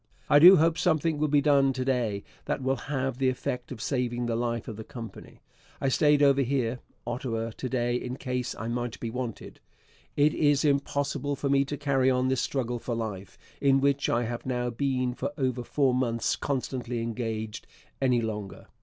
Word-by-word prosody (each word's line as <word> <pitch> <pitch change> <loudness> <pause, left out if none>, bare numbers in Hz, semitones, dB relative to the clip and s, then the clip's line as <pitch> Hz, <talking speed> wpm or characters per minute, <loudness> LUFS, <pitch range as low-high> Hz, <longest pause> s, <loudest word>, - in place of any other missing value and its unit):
I 145 - +8
do 180 +5 +10
hope 165 +1 +2
something 160 -2 +1
will 155 - +2
be 145 0 +3
done 140 -2 +4
to 130 0 -3
day 115 -6 0 0.2
that 135 - -2
will 135 +1 +1
have 135 -3 -1
the 130 -1 +3
effect 125 -1 -4
of - - -6
saving 120 -3 -1
the 115 -1 -1
life 115 -1 -2
of 110 - -5
the 110 - -7
Company. 115 0 -10 0.4
I 135 - +1
stayed 145 +1 +4
over 140 -1 +5
here 125 -2 0 0.3
[Ottawa] 115 -2 -3
to 130 +3 -5
day 120 -1 0
in 125 +1 -5
case 125 -2 -3
I 110 - -5
might 120 0 -3
be 115 - -4
wanted. 125 -2 -6 0.6
It 145 +1 +4
is 145 0 +2
impossible 145 0 0
for 140 +1 -2
me 140 0 +3
to 145 +1 -4
carry 135 -2 +2
on 130 0 +2
this 130 -1 +1
struggle 125 -3 -2
for 120 0 -3
life, 105 -5 -5 0.2
in 135 -1 +4
which 140 0 +1
I 120 - +1
have 120 +1 -4
now 125 -1 -1
been 130 0 -1
for 140 +3 -4
over 130 -3 -1
four 135 +1 +1
months 120 -2 0
constantly 125 -3 -3
engaged, 115 -2 -4 0.3
any 125 -3 +3
longer. 105 -3 -5
130 Hz, 190 wpm, -28 LUFS, 120-140 Hz, 0.6 s, do